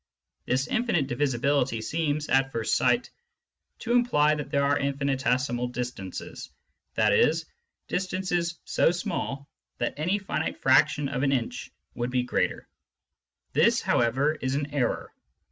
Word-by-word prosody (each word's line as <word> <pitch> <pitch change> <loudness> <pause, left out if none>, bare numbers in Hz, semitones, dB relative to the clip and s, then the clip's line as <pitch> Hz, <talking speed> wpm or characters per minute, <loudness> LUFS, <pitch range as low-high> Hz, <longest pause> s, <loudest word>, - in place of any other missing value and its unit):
This 130 +2 +1
infinite 235 - +1
divisibility 135 -1 0
seems, 150 +6 -1
at 135 +1 +2
first 115 -3 -1
sight, 240 - +2 0.7
to 235 - -3
imply 235 -12 +4
that 150 -2 -4
there 140 - +1
are 140 +1 +3
infinitesimal 130 -3 0
distances, 125 -6 -6 0.5
i.e. 110 +7 +4 0.5
distances 180 -2 -1
so - - +3
small 140 -5 -3 0.3
that - - -1
any 175 +7 +1
finite 195 -1 -3
fraction 135 +2 +3
of 125 - -3
an 135 -1 +2
inch 125 -4 -2 0.2
would 120 +1 -2
be 125 0 +1
greater. 125 - -1 0.9
This, - - +4
how - - +1
ever, 130 +6 +2
is 130 -3 -2
an 145 0 -3
error. 125 -5 -1
140 Hz, 130 wpm, -27 LUFS, 125-155 Hz, 0.9 s, imply